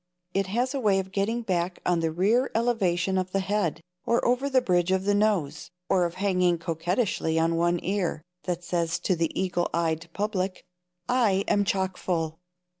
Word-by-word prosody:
It 195 -1 0
has 245 +7 0
a 275 - -1
way 205 -5 +3
of 190 0 -3
getting 220 +5 -1
back 180 -3 -1
on 175 -1 +2
the 165 0 0
rear 210 +10 +2
elevation 190 -6 +1
of 185 0 -4
the 195 - +2
head, 195 -4 -1 0.2
or 235 - +1
over 250 +3 +2
the 265 -1 +4
bridge 180 -6 +1
of 190 0 +2
the 205 +1 +2
nose, 195 -9 0 0.2
or 180 -2 +3
of 170 - -4
hanging 180 -3 +2
coquettishly 165 +1 -1
on 165 +1 +2
one 175 +1 +2
ear, 185 -5 -1 0.2
that 175 -1 -2
says 170 -1 -1
to 185 - 0
the 165 -1 0
eagle 175 -2 0
eyed 165 0 -1
public: 195 -2 -2 0.4
"I 215 -6 +2
am 205 0 +2
chockfull." 180 -4 -1
185 Hz, 180 wpm, -26 LUFS, 170-205 Hz, 0.4 s, the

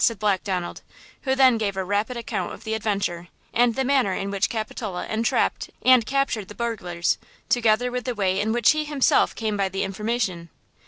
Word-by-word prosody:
said 230 - +3
Black 200 -1 +1
Donald, 180 -3 -3 0.4
who 265 0 +2
then 260 -4 +5
gave 200 -3 -1
a 190 - 0
rapid 205 +6 -1
account 235 - -3
of - - -11
the 220 - -3
adventure, 200 -5 -2 0.3
and 240 -1 +3
the 265 - +1
manner 260 -7 +2
in 195 +1 -3
which 200 0 +1
Capitola 215 -4 -4
entrapped 225 +2 0
and 255 -3 +6
captured 270 -7 0
the 205 - -11
burglars, 180 -8 -1 0.3
together 240 +1 +2
with 250 0 -3
the 250 -2 -2
way 190 -2 +1
in 215 +2 0
which 235 -2 +4
he 305 0 0
himself 295 -3 +2
came 220 -2 -2
by 195 -1 0
the 195 +1 -2
information. 195 -3 -2
220 Hz, 195 wpm, -24 LUFS, 195-240 Hz, 0.4 s, and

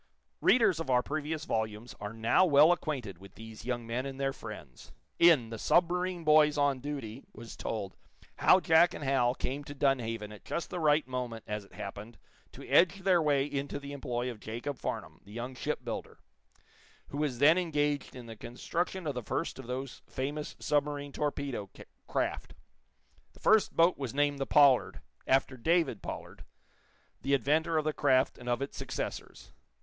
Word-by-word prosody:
Readers 215 -9 +4
of 165 -4 -4
our 125 -1 +3
previous 155 +1 -3
volumes 110 +1 -3
are 105 0 -5
now 115 +9 +3
well 155 -1 +6
acquainted 130 - -3
with 95 0 -14
these 110 0 -11
young 120 -2 -2
men 120 +3 -2
and 135 0 -6
their 135 0 0
friends. 105 - -10 0.3
In 150 -10 +5
"The 115 - -6
Submarine 180 - +1
Boys 150 -1 +5
on 145 -2 +2
Duty" 135 -4 -6
was 115 - -10
told 100 -4 -4 0.4
how 185 - +6
Jack 170 0 +4
and - - -6
Hal 130 -2 +2
came 140 +3 -4
to 145 0 -9
Dunhaven 115 -6 0
at 105 - -12
just 170 - -4
the 180 - -3
right 150 -3 +3
moment, 125 -3 -4
as 105 -1 -4
it - - -22
happened, 105 +2 -8 0.3
to - - -11
edge 185 +3 +4
their 185 -2 +4
way 145 -3 +2
into 140 -1 -3
the 140 0 -8
employ 125 -3 -3
of 115 - -11
Jacob 120 +6 -5
Farnum, - - -5
the 100 - -16
young 120 +3 -5
shipbuilder, - - -4 0.9
who 140 - -6
was 145 -5 -1
then 155 +7 +6
engaged 145 -4 -1
in 125 -2 -9
the 115 -1 -9
construction 165 - -4
of 145 - -1
the 125 - -4
first 135 +6 -3
of 130 - -9
those 130 +1 -5
famous 145 +3 -4
submarine 145 -1 -1
torpedo 140 -8 -3 0.4
craft. - - -2 0.8
The - - -19
first 220 -1 +3
boat 170 0 +4
was 135 -2 -4
named 145 -1 +1
the 135 - -2
"Pollard," 140 -4 +4 0.3
after 130 0 +2
David 160 - +1
Pollard, - - -7 0.8
the 140 +1 +2
inventor 155 +5 +1
of 155 - 0
the 155 - 0
craft 130 -3 +2
and 125 0 -6
of 120 +3 0
its 140 - -7
successors. - - -6
140 Hz, 175 wpm, -31 LUFS, 120-150 Hz, 0.9 s, well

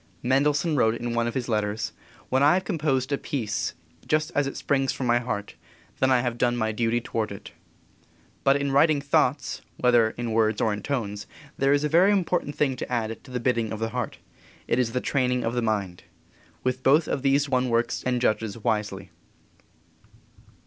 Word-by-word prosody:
Mendelssohn 145 +5 +2
wrote 110 -4 +3
in 120 0 -4
one 120 0 +1
of 120 - -4
his 125 -2 -2
letters: 105 -1 -1 0.4
"When 130 +1 +2
I 145 +4 +6
have 185 - 0
composed 145 -7 0
a 140 - 0
piece 115 -7 -3 0.3
just 155 +1 +1
as 145 -1 +1
it 135 - -5
springs 135 -1 +1
from 130 - -4
my 120 0 +3
heart, 120 -4 -4 0.5
then 130 - +3
I 130 -2 +4
have 120 -1 -3
done 120 0 +2
my 110 -1 0
duty 115 +2 0
toward 115 -2 -3
it." 100 - -9 0.9
But 135 0 +4
in 140 0 0
writing 145 +2 +4
thoughts, 140 0 0 0.2
whether 120 -3 +4
in 120 -1 -3
words 110 -1 +2
or 110 - +1
in 105 - -5
tones, 105 -6 -3 0.3
there 135 +1 +2
is 145 +1 +3
a - - +2
very 175 +6 +5
important 180 -6 0
thing 135 -3 +1
to - - -6
add 115 -2 -2
to - - -15
the 125 -1 -3
bidding 115 -2 0
of 110 - -3
the 115 +1 -2
heart. 125 -2 -4 0.5
It 120 - +1
is 115 -2 0
the 125 - 0
training 125 -2 0
of 115 - -1
the 120 - 0
mind. 100 -6 -2 0.6
With 130 0 -1
both 150 +5 +4
of 135 - -2
these 140 +1 +2
one 130 -2 +1
works 115 0 0
and 125 -1 0
judges 110 -3 0
wisely. 105 -4 -2
125 Hz, 195 wpm, -25 LUFS, 115-140 Hz, 0.9 s, I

